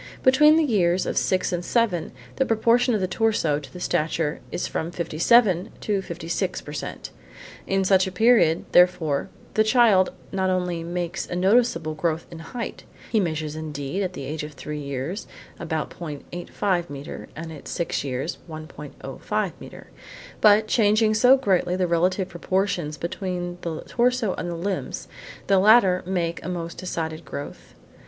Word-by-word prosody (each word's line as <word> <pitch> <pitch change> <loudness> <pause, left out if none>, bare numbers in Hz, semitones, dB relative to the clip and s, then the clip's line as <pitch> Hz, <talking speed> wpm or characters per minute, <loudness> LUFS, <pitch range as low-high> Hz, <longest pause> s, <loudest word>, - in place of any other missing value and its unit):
Between 300 +4 +6
the 325 - +4
years 185 - +2
of - - -2
six 185 0 +1
and 175 0 -2
seven 205 -6 0 0.3
the 265 - +3
proportion 235 +2 +3
of 210 - -1
the 185 - +1
torso 185 -8 +1
to 135 -3 -12
the 180 - -9
stature 155 -2 -1
is - - -2
from 160 - -3
57 175 +3 +3
to 205 -2 0
56 175 +1 -3
per 150 - -9
cent. - - -6 0.6
In 195 0 +1
such 190 0 +4
a - - -4
period 190 -5 +4
therefore 175 -5 +3 0.2
the 215 - +4
child 220 -4 +4 0.2
not 190 -1 0
only 180 -2 -1
makes 175 +1 -3
a - - -4
noticeable 185 -4 +2
growth 160 +1 -1
in 165 - -8
height, 230 +9 -6 0.3
(he 225 - +3
measures 155 -4 -2
indeed 150 +2 -4
at 185 -2 -2
the - - -6
age 155 +3 -4
of 150 0 -7
three 150 +1 -6
years 140 - -4 0.3
about 160 -2 -3
0.85 175 +3 -3
metre 140 0 -7
and 160 +1 -7
at 150 - -11
six 170 - -2
years 135 +3 -3
1.05 155 0 -5
metres) - - -11 0.5
but, 210 +1 +6
changing 215 0 +3
so 250 +5 +6
greatly 185 -7 +1
the 185 0 +1
relative 180 +2 +1
proportions 175 -3 -1
between 175 0 -4
the 165 -2 -4
torso 245 -4 +1
and 175 - -4
the 170 - -3
limbs, 190 +3 -4 0.4
the 195 -1 +4
latter 195 -3 +6
make 170 -3 -2
a 180 - -4
most 170 -2 -5
decided 165 -3 -4
growth. 140 - -8
180 Hz, 160 wpm, -24 LUFS, 160-205 Hz, 0.6 s, Between